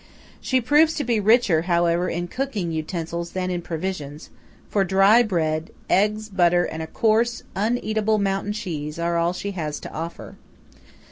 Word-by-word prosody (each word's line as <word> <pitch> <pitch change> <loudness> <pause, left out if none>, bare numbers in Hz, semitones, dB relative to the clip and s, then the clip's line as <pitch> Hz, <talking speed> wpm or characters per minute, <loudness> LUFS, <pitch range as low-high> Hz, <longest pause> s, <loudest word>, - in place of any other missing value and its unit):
She 260 - +1
proves 295 +6 +4
to 295 - -1
be 235 -2 +1
richer, 210 -6 +4
however, 170 0 +1
in 175 +1 -3
cooking 215 -7 -3
utensils 170 +1 -4
than 185 -1 -2
in 175 -1 -2
provisions; 160 -3 -5 0.4
for 200 - +1
dry 195 +5 +5
bread, 160 -7 -1 0.2
eggs, 210 +2 +2
butter, 175 -3 +3
and 160 - -5
a 160 - -5
coarse, 230 +6 +1
uneatable 215 0 0
mountain 195 +1 -1
cheese 160 -8 -5
are 170 0 -1
all 170 +1 +1
she 200 +2 -4
has 155 -6 -4
to - - -9
offer. 165 +2 -7
185 Hz, 155 wpm, -23 LUFS, 170-215 Hz, 0.4 s, dry